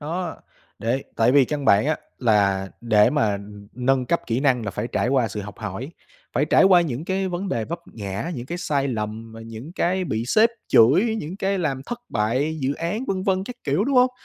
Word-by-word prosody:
Đó, 170 +5 -4 0.4
để 120 +5 -1
tại 115 +2 +4
vì 140 -1 +6
căn 145 +1 -3
bản 100 +2 +4
á, 155 - +1 0.2
là 100 -5 +2
để 105 -3 +4
mà, 135 -9 +2
ừm, 100 0 -8
nâng 130 +1 +1
cấp 170 - +1
kỹ 115 +2 0
năng 130 -5 +2
là 100 - -2
phải 105 +4 -4
trải - - +1
qua 130 -3 +2
sự 105 - -5
học 105 0 -9
hỏi, 110 - -5 0.4
phải - - +2
trải - - +4
qua 185 -2 +7
những 150 -3 -3
cái 190 +1 -1
vấn 180 +2 -3
đề 115 -10 -1
vấp 170 +8 -5
ngã, 100 - -4
những 120 -1 -6
cái 175 +5 -4
sai 140 -5 0
lầm, 110 -1 -4
và 115 - -10
những 115 +7 -9
cái 185 +1 0
bị 110 -8 -2
sếp 220 - +5 0.2
chửi, 180 - +5
những 165 +5 -6
cái 195 0 0
làm 140 -6 -1
thất 240 - -4
bại 130 +9 0
dự 135 +1 0
án 180 - -3
vân 190 -5 -1
vân 190 -1 +1
các 250 +4 -8
kiểu, 145 +9 +1
đúng 270 +1 0
hông? 250 0 +6
135 Hz, 225 wpm, -23 LUFS, 110-175 Hz, 0.4 s, qua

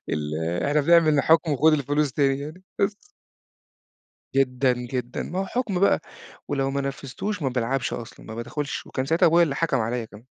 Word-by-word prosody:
ال 75 0 -2 0.3
إحنا 145 +1 +2
بنعمل 155 -2 +5
حكم 160 +1 +3
وخد 155 +3 +4
الفلوس 145 -1 +1
تاني 135 -1 +2
يعني 155 +6 -8 0.2
بس. 200 +1 +1 1.4
جدًا، 130 -1 +2
جدًا، 125 0 -4
ما 185 - -4
هو 195 - -1
حكم 215 -5 -2
بقى 200 - +4 0.5
ولو 135 -1 0
ما 140 +1 -1
نفذتوش 140 - -4
ما 135 - +1
بالعبش 125 +1 -1
أصلًا، 115 - -8
ما 110 - -7
بادخلش 130 +5 -4
وكان 130 - -3
ساعتها 165 +4 +3
أبويا 170 +1 +5
اللي 150 -5 +1
حكم 160 -4 +1
عليّا 115 +2 -1
كمان. 110 0 -14
140 Hz, 175 wpm, -24 LUFS, 125-160 Hz, 1.4 s, بنعمل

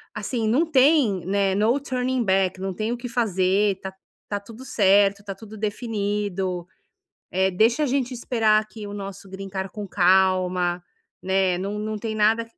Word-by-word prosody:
assim, 220 +2 -2
não 260 +10 +3
tem, 265 - +3
né, 195 0 +1
no 220 +7 +2
turning 255 -2 -1
back, 190 -2 +1
não 190 0 -3
tem 215 +5 -2
o 240 - -2
que 245 +1 -7
fazer, 195 -3 +1
tá 190 0 -6 0.4
tá 205 - -2
tudo 230 +5 -12
certo, 200 -2 +3
tá 200 -1 -5
tudo 220 +1 -11
definido, 205 -4 -2 0.6
eh, 190 +1 +2
deixa 225 +9 +2
a - - +2
gente 260 -1 -1
esperar 225 -3 +2
aqui 215 0 -10
o 205 - -7
nosso 195 -1 -8
green 195 +1 -7
card 190 0 -4
com 210 - -6
calma, 185 -1 +2 0.4
né, 190 -1 +1
não 200 +3 -3
não 215 +1 -3
tem 220 +1 -4
nada". 220 +2 +2
205 Hz, 170 wpm, -24 LUFS, 190-230 Hz, 0.6 s, não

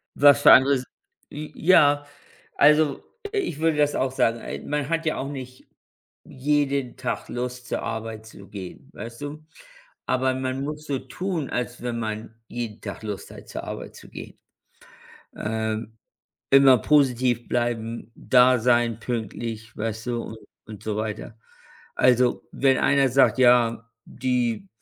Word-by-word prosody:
Was 145 0 +6
für - - +8
anderes? 135 0 +6 0.5
J 150 +1 -7
ja, 145 -4 +4 0.5
also, 150 -1 +4 0.3
ich 380 - -2
würde 160 -2 +1
das 145 0 +2
auch 130 0 0
sagen, 115 -3 +1
äh, - - -6
man 150 0 -3
hat 165 0 -1
ja 155 - 0
auch 135 - -4
nicht 130 -2 -9 0.6
jeden 140 -1 -1
Tag - - -4
Lust 125 0 -5
zur - - -2
Arbeit 110 -1 -5
zu 100 -3 -13
gehen, 95 -2 -9
weißt 115 +5 -9
du. 150 +2 -7 0.6
Aber 130 0 +1
man 130 +1 -3
muss 150 +1 -5
so 135 -2 -1
tun, 180 -6 -4
als 125 0 -4
wenn 120 -1 -2
man 110 0 -5
jeden 115 -2 -5
Tag - - -7
Lust 105 -2 -6
hat, - - -13
zur - - -6
Arbeit - - -7
zu - - -14
gehen. - - -10 1.0
Ähm, 110 +1 -3 0.5
immer 135 -2 +7
positiv 125 -3 +2
bleiben, 115 -1 -2
da 125 0 +4
sein, 120 -1 +2
pünktlich, 115 -1 -5
weißt 110 +1 -4
du 120 -1 -2
un 110 - -8 0.3
und 105 -2 -10
so 110 -2 -3
weiter. 110 -1 -5 0.6
Also, 125 -1 +3
wenn 135 -1 +3
einer 140 0 +3
sagt: 130 -2 +3
„Ja, 115 -2 +3
die, 120 -5 -2
125 Hz, 145 wpm, -24 LUFS, 115-140 Hz, 1.0 s, für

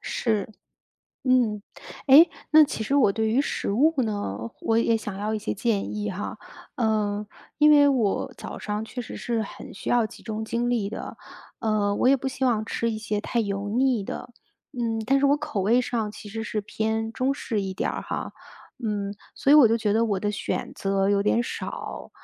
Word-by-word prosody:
是。 220 -4 -1 0.8
嗯。 235 -5 +2 0.4
哎， 285 +5 +9 0.2
那 310 0 +8
其 275 - -4
实 270 - -1
我 220 -8 +4
对 220 +1 0
于 235 +5 +3
食 285 - -2
物 305 +9 +3
呢， 205 - -3 0.2
我 225 0 +2
也 230 0 +3
想 210 -3 -6
要 215 +2 -2
一 - - -1
些 210 - -3
建 210 -1 -1
议 210 -1 -2
哈， 190 +2 -5 0.4
呃， 210 -3 0 0.3
因 300 0 +6
为 290 -1 +7
我 235 -8 0
早 - - -7
上 210 +1 -3
确 245 - -6
实 - - -8
是 230 -2 -1
很 - - -9
需 - - -5
要 240 -2 +3
集 - - -14
中 220 -1 -4
精 235 +2 -1
力 225 -5 0
的， 215 - -7 0.4
呃， 210 -2 +1
我 250 - +2
也 275 - +6
不 270 - -6
希 265 0 -2
望 220 -4 +1
吃 230 +1 -1
一 220 - -3
些 210 -1 -2
太 235 +3 -1
油 200 -1 -2
腻 250 0 +2
的， 245 +5 -6 0.4
嗯， 230 -3 -2
但 275 +1 +4
是 280 - +4
我 285 +1 +4
口 295 -9 -3
味 230 +6 +3
上 225 -4 -2
其 210 - -10
实 225 +1 -4
是 215 -1 -2
偏 220 +2 -2
中 260 +2 0
式 225 -6 -2
一 190 -1 -4
点 - - -1
儿 - - -4
哈， - - -5 0.5
嗯， 205 -2 -2 0.2
所 275 - 0
以 - - +9
我 275 -7 +8
就 230 - +3
觉 215 -3 0
得 225 +1 +3
我 200 -3 0
的 205 +1 -1
选 205 - -3
择 195 0 0
有 200 0 +3
点 230 +3 +2
少。 - - -6
220 Hz, 220 characters per minute, -25 LUFS, 210-245 Hz, 0.8 s, 哎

